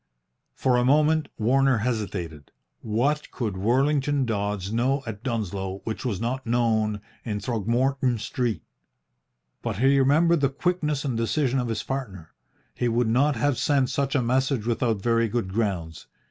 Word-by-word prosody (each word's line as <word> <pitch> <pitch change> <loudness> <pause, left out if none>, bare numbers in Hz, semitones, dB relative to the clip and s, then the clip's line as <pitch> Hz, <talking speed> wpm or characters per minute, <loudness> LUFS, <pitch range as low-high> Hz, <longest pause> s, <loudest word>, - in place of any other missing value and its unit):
For 125 -2 +2
a 125 - +2
moment 150 +3 +3
Warner 135 +3 +3
hesitated. 100 - -3 0.3
What 135 +8 0
could 110 -7 -3
Worlington 135 +6 +1
Dodds 100 -3 -2
know 130 +4 +1
at 110 -3 -6
Dunsloe 100 -6 -3
which 110 - -4
was 115 -8 -2
not 125 +4 -2
known 110 -3 +1 0.2
in 105 -3 -3
Throgmorton 120 +4 0
Street? 120 +1 -2 1.0
But - - -3
he 135 +4 +4
remembered 155 +4 +4
the 140 - +3
quickness 150 -1 -1
and 130 -4 -1
decision 130 +3 0
of 125 - -1
his 115 -2 -2
partner. 100 -12 -5 0.4
He 120 - -1
would 120 0 +1
not 140 +5 +3
have 135 +3 0
sent 135 -3 +2
such 140 +1 -1
a 130 - +2
message 130 -1 +1
without 115 -3 0
very 115 -1 +2
good 100 -5 -2
grounds. 95 -7 -2
120 Hz, 150 wpm, -25 LUFS, 110-135 Hz, 1.0 s, he